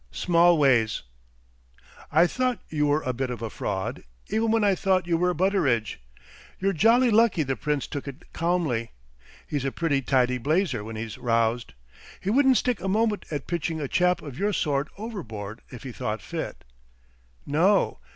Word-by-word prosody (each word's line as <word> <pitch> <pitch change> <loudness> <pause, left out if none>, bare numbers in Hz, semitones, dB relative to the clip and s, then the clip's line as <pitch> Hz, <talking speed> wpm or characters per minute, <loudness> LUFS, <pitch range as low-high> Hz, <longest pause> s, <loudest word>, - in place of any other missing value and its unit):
"Smallways." 140 - +3 1.1
"I 160 +3 +5
thought 255 +5 0
you 150 -1 +1
were 145 +2 +1
a 130 - -1
bit 130 +1 -2
of 120 -2 -5
a 110 - -4
fraud 95 -2 -3 0.3
even 225 +1 +1
when 225 -1 +2
I 200 -1 +4
thought 185 -1 +1
you 170 -1 +1
were 180 +2 +2
Butteridge. 155 - +1 0.6
You're 195 +1 +1
jolly 230 +7 +4
lucky 220 -7 +4
the 135 -1 -2
Prince 150 -1 -1
took 145 0 -6
it 140 +4 -10
calmly. 165 -9 -1 0.5
He's 145 -3 -3
a 135 - -1
pretty 145 -4 0
tidy 125 -1 +1
blazer 145 - 0
when 110 +1 -7
he's 110 -1 -6
roused. 115 - 0 0.4
He 195 - -2
wouldn't 265 +1 +5
stick 250 -4 0
a 190 - -3
moment 215 +1 +1
at 145 -4 -4
pitching 165 -1 -2
a 145 - -2
chap 180 +3 +2
of 140 -4 -8
your 205 +1 +1
sort 145 -4 0
overboard 115 - -7
if 125 - -10
he 130 - -6
thought - - -3
fit. - - -5 0.8
No!... 180 - +2
155 Hz, 170 wpm, -26 LUFS, 125-195 Hz, 1.1 s, I